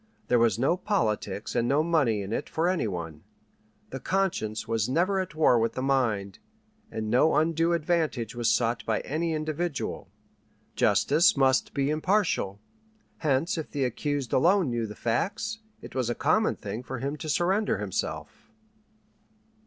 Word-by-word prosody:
There 125 - +4
was 115 -4 +3
no 135 +9 +2
"politics" 110 - -1
and 120 - +1
no 140 +4 +3
money 140 -11 +1
in 100 +3 -5
it - - -3
for 165 +2 0
any 180 -10 +1
one. 85 -5 -6 0.7
The 135 - -5
conscience 135 - -1
was 115 0 0
never 185 +8 +1
at 185 -5 -4
war 150 -6 +4
with 115 0 0
the 130 - -3
mind, 110 -8 0 0.5
and 110 -1 -4
no 135 +7 +4
undue 165 +2 +2
advantage 155 -8 0
was 120 -1 0
sought 115 0 +1
by 110 -1 -1
any 160 +3 -2
individual. 155 0 -3 0.7
Justice 155 +2 +3
must 130 -1 +2
be 140 0 +1
impartial; 155 - 0 0.6
hence 155 +3 0
if 155 - -6
the 140 -3 -1
accused 140 0 -2
alone 175 0 +3
knew 115 -1 -1
the 105 - -9
facts, 200 - -2 0.2
it - - -10
was 130 -3 -1
a 120 - -1
common 215 +9 +2
thing 105 +3 -6
for 130 +1 -6
him 140 +4 -3
to 155 - -6
surrender 190 +7 +1
himself. - - -5
135 Hz, 160 wpm, -27 LUFS, 115-165 Hz, 0.7 s, There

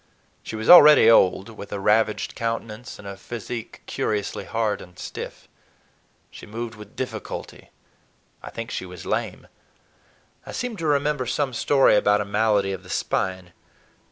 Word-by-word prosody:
She - - -7
was 110 +1 -4
already 150 -9 +9
old, 95 -1 +4
with 105 -2 -10
a 100 - -3
ravaged 105 +1 +1
countenance 115 +1 -5
and 100 - -11
a 100 - -6
physique 115 +3 -7
curiously 105 -1 -3
hard 110 -2 -1
and 90 0 -14
stiff. - - -8 0.8
She - - -12
moved 115 +2 -5
with 105 -1 -13
difficulty—I 130 - -9
think 115 0 -7
she 95 - -4
was 90 -1 -10
lame—I - - -8
seem 245 -2 -3
to 165 -3 -3
remember 145 -2 +1
some 130 +2 -1
story 135 0 +4
about 105 0 +3
a 105 - -2
malady 105 -1 +1
of 95 - -6
the 90 - -16
spine. 95 -2 -2
110 Hz, 145 wpm, -24 LUFS, 100-120 Hz, 0.8 s, already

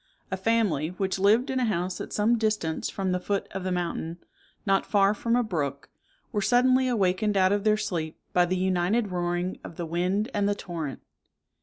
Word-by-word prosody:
A - - +1
family, 190 -8 +1
which 190 +2 -2
lived 225 +7 +4
in 260 - 0
a 250 - +2
house 185 -3 -1
at - - -7
some 215 +3 +2
distance 210 -8 -1
from 190 -2 -2
the 180 - 0
foot 200 +2 -2
of 190 -1 -5
the 185 - -2
mountain, 170 -1 -2 0.5
not 195 -1 +3
far 200 -1 +3
from 230 +2 0
a 245 - +3
brook, 145 - -3 0.4
were 205 - 0
suddenly 255 +4 +4
awakened 205 -3 +1
out 185 0 +4
of 205 0 +1
their 215 0 +3
sleep 170 -7 -3 0.2
by 180 0 +4
the 185 +1 0
united 190 +4 +1
roaring 175 +1 -2
of - - -9
the 170 - -4
wind 180 +6 -1
and 205 -1 +1
the 205 - +1
torrent. 165 -8 -6
190 Hz, 195 wpm, -27 LUFS, 175-215 Hz, 0.5 s, lived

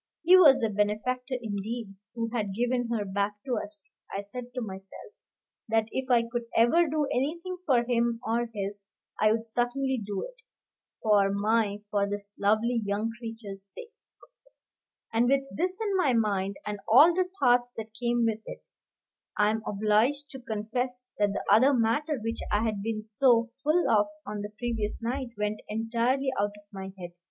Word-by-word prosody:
He 355 +3 +7
was 280 -9 +7
a 225 - +2
benefactor, 215 +6 -1
indeed, 220 0 -4 0.2
who 230 -1 -2
had 205 -5 -2
given 245 +1 0
her 225 -3 -1
back 200 +1 -1
to 255 -3 -1
us. 205 -1 -9 0.2
I 200 - -3
said 240 +5 -7
to 250 - -2
myself, 195 - -8 0.6
that 225 0 +2
if 265 0 -3
I 240 -2 +5
could 235 0 -4
ever 320 +10 +5
do 300 0 0
anything 340 +8 -2
for 245 -4 +4
him 235 -1 +1
or 235 +1 0
his, 200 -1 -5 0.4
I 215 0 +4
would 225 +1 -1
certainly 245 +2 0
do 200 -1 -3
it, - - -8 0.7
for 205 -3 +4
my 205 0 +1
for 200 -1 +1
this 205 0 -4
lovely 220 +4 +2
young 205 +3 -1
creature's 225 -4 -7
sake. 450 - -10 1.2
And 235 +2 +3
with 275 0 +2
this 365 +2 -1
in 420 -3 -1
my 300 -9 +3
mind, 200 -4 +1
and 210 -1 -4
all 295 +10 +8
the 365 +1 0
thoughts 245 -2 +4
that 220 -1 -6
came 240 +1 0
with 220 -1 0
it, - - -8 0.7
I 210 0 +4
am 220 0 -2
obliged 220 +8 +1
to 265 - -8
confess 245 +2 -3
that 205 -1 +3
the - - -4
other 265 +5 +6
matter, 275 +6 +1
which 225 +1 -3
I 210 +1 +2
had 215 -3 -1
been 215 0 -3
so 230 +1 +3
full 320 +4 +3
of 210 -1 +4 0.2
on 210 0 -4
the 205 - -5
previous 225 -3 -2
night, 250 +2 -3
went 210 0 -1
entirely 235 +5 0
out 205 0 0
of 205 - -16
my 190 0 -6
head. 175 -2 -7
230 Hz, 175 wpm, -28 LUFS, 210-250 Hz, 1.2 s, all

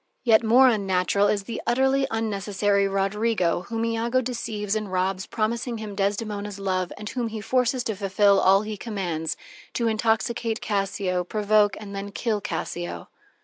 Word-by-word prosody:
Yet 230 -2 +5
more 245 +4 +6
unnatural 200 -3 +2
is 205 -1 0
the 230 - -5
utterly 265 +2 +2
unnecessary 205 -2 0
Roderigo 195 -2 0
whom 230 -1 -2
Iago 230 +2 +1
deceives 225 -4 -3
and 215 -3 -3
robs, 185 +1 -1
promising 230 +2 -2
him 215 -2 -6
Desdemona's 205 0 -2
love, 185 -2 -1
and 210 0 -7
whom 240 +1 -2
he 220 -1 -5
forces 250 +3 +1
to 220 - -1
fulfil 200 0 +3
all 195 +2 +5
he 215 0 -5
commands: 180 -8 -3 0.4
to 235 - 0
intoxicate 225 +1 0
Cassio, 195 -3 -1
provoke 210 +1 +2
and 200 -2 -8
then 200 +1 -4
kill 215 0 -1
Cassio. 175 0 -4
210 Hz, 150 wpm, -25 LUFS, 195-230 Hz, 0.4 s, more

